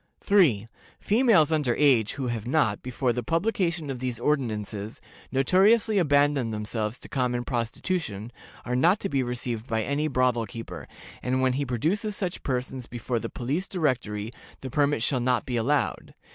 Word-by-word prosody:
"3. 145 - +3 0.3
Females 210 - +4
under 145 -6 +1
age, 130 -8 +3
who 140 -2 -4
have 120 -2 -3
not, 125 -7 +1
before 125 0 -1
the 125 - -2
publication 170 - 0
of 130 - -5
these 125 -2 -3
ordinances, 110 -6 -2 0.3
notoriously 200 - +4
abandoned 145 -6 +3
themselves 105 +1 -3
to - - -12
common 125 -2 -1
prostitution, 120 - -3 0.3
are 125 - -1
not 175 +10 +4
to 195 - -3
be 135 -5 +1
received 120 -2 -3
by 110 -2 0
any 145 +4 0
brothel 125 -4 +1
keeper, 115 +3 -8 0.3
and 130 +1 0
when 130 -1 +3
he 140 +1 -1
produces 190 - -1
such 185 -3 -4
persons 130 -1 -3
before 120 0 -3
the - - -5
Police 145 +10 -2
Directory 120 - -1 0.3
the 130 - -6
permit 145 -4 +2
shall 130 +1 +1
not 125 -1 +1
be 125 - -3
allowed. 135 +5 0
130 Hz, 160 wpm, -26 LUFS, 120-150 Hz, 0.3 s, Females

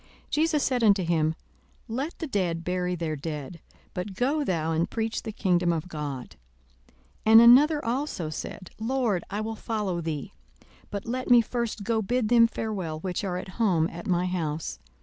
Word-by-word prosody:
42:009:060 - - -28 0.2
Jesus 310 -1 +2
said 250 -3 +1
unto 200 -3 +5
him, 160 -2 +1 0.5
Let 270 +9 -3
the 325 - -4
dead 180 - -1
bury 180 0 -1
their 160 -2 -2
dead: 150 +2 -6 0.3
but 190 +1 -5
go 280 +7 +1
thou 165 - -1
and 165 +1 0
preach 225 -1 -2
the 220 - -5
kingdom 180 -4 +1
of 165 +1 -2
God. 145 -6 -6 0.9
42:009:061 - - +5
And 225 +1 +10
another 290 +6 +6
also 230 - -2
said, 185 +3 -7
Lord, 230 -5 0
I 205 +2 -2
will 220 +1 -3
follow 210 -6 -2
thee; 155 -4 -4 0.6
but 200 -1 -5
let 255 +3 -3
me 245 -1 +8
first 235 -2 -3
go 225 +1 +1
bid 235 +1 0
them 235 -1 +6
farewell, 190 -9 -4
which 180 +1 -3
are 180 -2 -2
at 185 - -6
home 175 -7 +3
at 170 +1 -8
my 180 -1 +2
house. 165 -4 -3
195 Hz, 180 wpm, -27 LUFS, 170-235 Hz, 0.9 s, And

